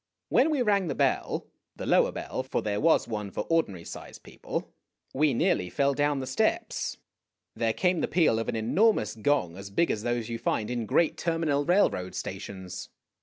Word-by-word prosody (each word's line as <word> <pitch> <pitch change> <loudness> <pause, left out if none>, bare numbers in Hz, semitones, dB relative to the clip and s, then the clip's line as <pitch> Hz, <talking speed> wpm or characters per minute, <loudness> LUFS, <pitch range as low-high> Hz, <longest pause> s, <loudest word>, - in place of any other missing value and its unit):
When 295 - +4
we 290 -5 +1
rang 200 -4 +2
the 140 - -2
bell, - - 0 0.3
the - - -6
lower - - +4
bell, - - -4
for - - -2
there 105 -1 -1
was 165 +2 +4
one 105 -3 -4
for - - -3
ordinary 100 - +1
sized - - -9
people, - - -6 0.4
we 150 +2 +3
nearly 155 - +1
fell 140 +5 +1
down 145 0 +1
the 130 - -3
steps. 130 0 -1 0.6
There 115 -1 +1
came 180 +7 +1
the - - +1
peal 160 -10 +3
of 115 - -3
an - - -1
enormous 115 - +2
gong 110 -7 0
as 100 +1 -8
big 165 +12 +2
as 105 - -2
those 120 -1 -1
you 115 -1 -4
find 110 0 -1
in 120 -3 -2
great 165 +9 +2
terminal 165 -4 0
railroad 155 - +2
stations. 95 -2 -6
130 Hz, 185 wpm, -28 LUFS, 105-165 Hz, 0.6 s, When